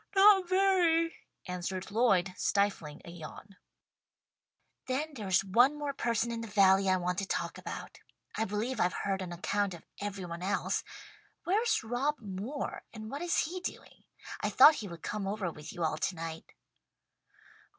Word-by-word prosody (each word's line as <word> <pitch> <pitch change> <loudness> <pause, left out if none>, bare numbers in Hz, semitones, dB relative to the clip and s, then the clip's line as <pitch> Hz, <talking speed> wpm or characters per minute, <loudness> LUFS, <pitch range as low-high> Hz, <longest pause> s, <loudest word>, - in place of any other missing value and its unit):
"Not 390 -2 +7
very," 360 -4 +3 0.3
answered 185 +1 -4
Lloyd, 195 -5 +3
stifling 195 -7 0
a 170 - -8
yawn. 175 +4 -10 1.3
"Then 290 +4 -2
there's 195 -7 +1
one 245 +9 +4
more 290 -1 -3
person 235 -2 0
in 230 -1 -3
the 230 - -6
valley 195 -2 +4
I 185 - +4
want 180 +1 -1
to 195 - -4
ask - - -5
about. - - -7 0.4
I 220 - 0
believe 215 +4 -2
I've 180 +1 +1
heard 195 -1 0
an 180 -2 -5
account 190 +2 -1
of 165 - -14 0.2
every 200 -2 -4
one 170 0 -6
else. 190 +2 0 0.6
Where's 435 - +2
Rob 245 +6 0
Moore 210 +6 -5
and 220 -1 -8
what 280 +3 -4
is 350 -1 +2
he 355 +5 -3
doing? 360 - -8 0.3
I - - 0
thought 310 - +9
he 215 -8 -5
would 170 -2 -10
come 210 -2 -3
over 195 -3 -2
with 150 0 -9
you 175 - -4
all 155 -1 0
tonight." 165 -1 -4
205 Hz, 160 wpm, -31 LUFS, 185-275 Hz, 1.3 s, thought